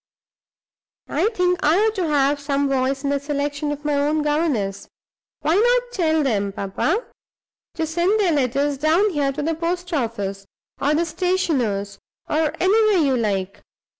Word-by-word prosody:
I 430 - +1
think 360 -5 0
I 305 +3 +3
ought 435 +1 +2
to 370 -6 -1
have 285 -1 +2
some 280 0 0
voice 270 +1 0
in 280 - 0
the 285 - +1
selection 290 +1 -2
of 295 0 -6
my 300 - +1
own 295 +2 +1
governess. 295 -11 -1 0.5
Why 310 +2 +1
not 485 +2 +2
tell 315 -4 +1
them, 205 -7 0
papa, 300 - -1 0.7
to 325 - -1
send 345 +7 +1
their 380 -5 +3
letters 280 0 0
down 335 +8 +3
here 285 -4 0
to 295 +2 -4
the 325 +2 0
post 350 +2 -3
office 205 -7 -3 0.3
or 290 +2 +1
the 335 +2 +1
stationer's, 280 - -1 0.3
or 310 0 0
anywhere 425 +2 +4
you 270 -2 +2
like? 200 -5 -2
295 Hz, 160 wpm, -22 LUFS, 270-345 Hz, 0.7 s, anywhere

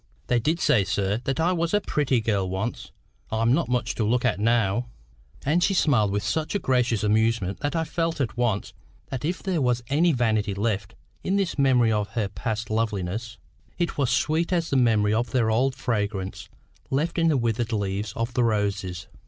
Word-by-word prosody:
"They 120 - +2
did 155 +8 0
say, 105 -9 +3
sir, 100 +3 -1
that 135 +3 -1
I 170 +3 +3
was 170 0 0
a - - +4
pretty 140 - 0
girl 100 -4 0
once. 95 +6 -4 0.4
I'm 115 +2 +2
not 170 0 +1
much 125 -1 0
to 110 - -1
look 120 +4 +1
at 105 -6 +1
now." 115 +1 +1 0.6
And 165 +5 +2
she 195 - +2
smiled 125 - +3
with 100 0 -1
such 160 - -1
a - - +4
gracious 125 - +1
amusement, 110 -2 +1
that 145 +3 -2
I 165 - +1
felt 165 0 -2
at 125 -5 -1
once 120 -4 -1 0.4
that 130 -2 -4
if 175 +4 -2
there 185 -5 0
was 125 -2 +1
any 165 +5 +3
vanity 110 -6 +1
left 100 -1 -2 0.3
in 190 - 0
this 195 -6 -1
memory 125 -4 +4
of 105 -2 0
her 110 -4 0
past 110 +2 -4
loveliness, 110 0 -2 0.4
it 175 -1 -1
was 135 -4 +2
sweet 160 +7 +1
as 170 -2 0
the - - +2
memory 110 -5 +3
of 115 +2 0
their 115 -2 +1
old 130 +4 +1
fragrance 100 -7 -3 0.4
left 155 +6 0
in 165 - +3
the 155 -4 +3
withered 115 -1 -1
leaves 100 -1 -2
of 115 +1 -3
the 125 - +2
roses. 100 -5 -1
115 Hz, 195 wpm, -25 LUFS, 105-140 Hz, 0.6 s, a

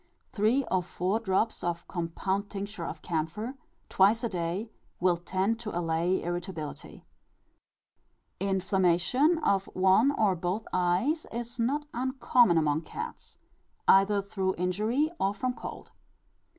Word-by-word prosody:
Three 225 +6 +2
or 185 - +3
four 185 +4 -1
drops 220 +1 0
of 170 -1 -3
compound 190 +3 -2
tincture 200 -3 -5
of 155 - -7
camphor, 175 +9 -2 0.3
twice 210 +5 +3
a 235 - 0
day, 180 +4 -3 0.3
will 180 0 +3
tend 190 +6 -1
to 215 -6 -4
allay 170 +2 0
irritability. 175 -3 -5 1.3
Inflammation 190 - +2
of 195 -1 +2
one 190 +7 +5
or 210 -7 +2
both 180 +5 -2
eyes 185 - +1
is 235 +1 -5
not 280 +6 0
uncommon 250 -6 +3
among 155 -1 +2
cats, 455 - -8 0.5
either 195 +1 +5
through 190 -1 -1
injury, 215 - 0
or 195 +1 +1
from 255 +4 -1
cold. - - -8
195 Hz, 125 wpm, -29 LUFS, 175-230 Hz, 1.3 s, one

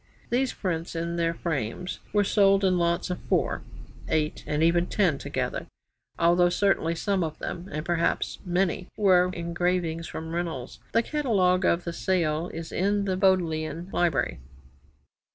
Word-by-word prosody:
These 255 +2 +2
prints 170 -3 -3
in 170 +1 -2
their 170 0 0
frames 160 +1 -3
were 205 -1 +3
sold 195 -1 +4
in 185 -1 +3
lots 170 +1 0
of 180 - -4
4, - - +1 0.5
8, 155 -1 0
and 150 +1 +1
even 170 +1 +3
10 175 -9 +1
together, - - -3 0.5
though 175 +1 +4
certainly 175 -3 +1
some 195 +1 0
of 155 -1 -4
them 180 +3 -6
and 155 +1 -4
perhaps 170 -1 0
many 180 0 0
were 185 -3 +5
engravings 170 -1 -1
from 160 0 -6
Reynolds. 165 -7 -4
The 230 +2 +4
Catalogue 200 -11 +2
of 170 +1 +2
the 170 - -4
sale 170 -2 0
is 165 0 -7
in 200 +2 +1
the 190 -2 0
Bodleian 175 -2 +1
Library. 135 - +1
175 Hz, 150 wpm, -27 LUFS, 165-190 Hz, 0.5 s, were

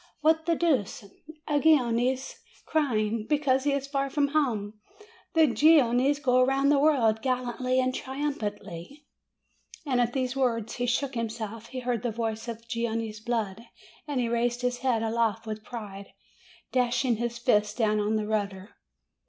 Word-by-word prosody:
What 320 +1 +2
the 335 - +3
deuce! 265 - 0 0.4
A 295 -1 +2
Genoese 260 -3 +2 0.3
crying 225 -8 0
268 - - -31
MAY 300 - +4
because 265 -3 +1
he 290 - +3
is 280 -1 -1
far 275 0 -2
from 285 +1 +1
home! 220 -9 -1 0.6
The 320 -1 +6
Genoese 275 0 +4
go 255 -3 +3
round 270 +2 +2
the 285 - +4
world, 245 -8 +3
gallantly 255 0 0
and 255 0 +1
triumphantly 265 - -5 0.4
!" - - -22
And 255 -4 +1
at 240 0 0
these 260 -1 -1
words 230 -5 -1
he 245 0 -1
shook 265 +3 0
himself, 225 -1 -5
he 255 -1 -6
heard 245 -2 -1
the 245 - -1
voice 225 0 -3
of 230 -1 -6
the - - -27
Genoese 230 -2 -3
blood, 220 -3 -2 0.5
and 285 -3 -1
he 240 - 0
raised 240 +1 0
his 245 0 -1
head 245 -4 +1
aloft 225 -1 0
with 215 -1 -6
pride, 205 -4 -8 0.6
dashing 250 -1 +1
his 235 +1 -3
fists 210 -3 +2
down 215 -3 +1
on 210 +1 0
the 215 -1 -1
rudder. 200 -2 -3
245 Hz, 170 wpm, -27 LUFS, 220-270 Hz, 0.6 s, The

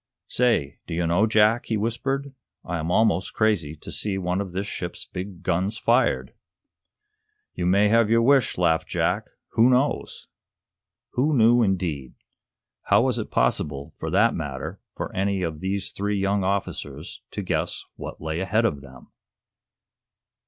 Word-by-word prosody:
Say, 115 - +1
do 80 - -4
you 85 0 0
know, 90 +6 +3
Jack," 110 +2 +3
he 110 - 0
whispered, 135 +6 -2 0.3
"I 90 -2 -3
am 80 +1 -3
almost 95 -2 +2
crazy 100 -9 +1
to - - -10
see 100 -2 -2
one 90 +1 -1
of 95 -3 -5
this 95 +3 -3
ship's - - -5
big 90 -1 -7
guns 95 +4 0
fired!" 120 +3 +2 1.2
"You 90 - -2
may 100 +3 +4
have 115 0 +4
your 115 0 +4
wish," 135 -1 +3
laughed 85 -2 +2
Jack. - - -1 0.2
"Who 115 +3 +4
knows?" 130 +3 0 0.8
Who 145 +3 +1
knew, 120 +1 +5
indeed? 90 - -1 0.7
How - - +5
was - - +1
it - - -4
possible, 70 +4 0
for - - -3
that - - +4
matter, - - -5 0.2
for - - -5
any 95 0 0
of 80 -3 -3
these 95 +2 -2
three 100 +1 -2
young 100 0 +1
officers 100 +1 -3
to - - -5
guess - - -2
what - - -8
lay 80 +1 -3
ahead 105 +5 +1
of 75 -11 0
them? 65 -2 -15
100 Hz, 155 wpm, -24 LUFS, 85-115 Hz, 1.2 s, knew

